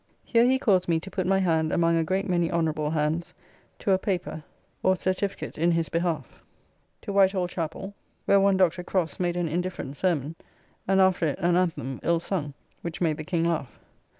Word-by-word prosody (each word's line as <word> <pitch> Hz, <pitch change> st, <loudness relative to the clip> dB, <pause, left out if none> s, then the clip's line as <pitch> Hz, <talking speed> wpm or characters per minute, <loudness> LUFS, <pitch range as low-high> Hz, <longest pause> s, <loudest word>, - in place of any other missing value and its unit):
Here 235 Hz, 0 st, +3 dB
he 260 Hz, +1 st, +4 dB
caused 190 Hz, -8 st, +2 dB
me 165 Hz, -1 st, +3 dB
to 190 Hz, +4 st, -10 dB
put 185 Hz, -1 st, -2 dB
my 195 Hz, 0 st, +3 dB
hand 160 Hz, -4 st, +1 dB
among 170 Hz, 0 st, +2 dB
a 165 Hz, -, +2 dB
great 190 Hz, +4 st, -1 dB
many 175 Hz, -2 st, +1 dB
honorable 155 Hz, -3 st, 0 dB
hands 160 Hz, +2 st, -1 dB, 0.4 s
to 200 Hz, -, -1 dB
a 190 Hz, -, +4 dB
paper 180 Hz, -5 st, -3 dB, 0.4 s
or 185 Hz, -, +3 dB
certificate 185 Hz, -1 st, -3 dB
in 170 Hz, +2 st, +3 dB
his 165 Hz, -1 st, 0 dB
behalf. 165 Hz, -5 st, -2 dB, 0.6 s
To 200 Hz, -, -4 dB
White 195 Hz, -1 st, +5 dB
Hall 185 Hz, -2 st, 0 dB
chappell, 175 Hz, +3 st, -5 dB, 0.3 s
where 200 Hz, -, +5 dB
one 195 Hz, -1 st, +3 dB
Dr. 180 Hz, -2 st, +2 dB
Crofts 175 Hz, -2 st, -1 dB
made 175 Hz, -1 st, 0 dB
an 175 Hz, -1 st, 0 dB
indifferent 175 Hz, -4 st, -3 dB
sermon, 160 Hz, -4 st, 0 dB, 0.5 s
and 195 Hz, 0 st, +3 dB
after 185 Hz, -3 st, +3 dB
it 145 Hz, -, -2 dB
an 175 Hz, 0 st, +2 dB
anthem, 165 Hz, -8 st, -1 dB
ill 170 Hz, 0 st, +2 dB
sung, 160 Hz, -5 st, -3 dB, 0.3 s
which 170 Hz, -1 st, -5 dB
made 160 Hz, -4 st, +1 dB
the 155 Hz, -, -5 dB
King 165 Hz, +1 st, -1 dB
laugh. 165 Hz, -6 st, -2 dB
175 Hz, 195 wpm, -26 LUFS, 160-190 Hz, 0.6 s, White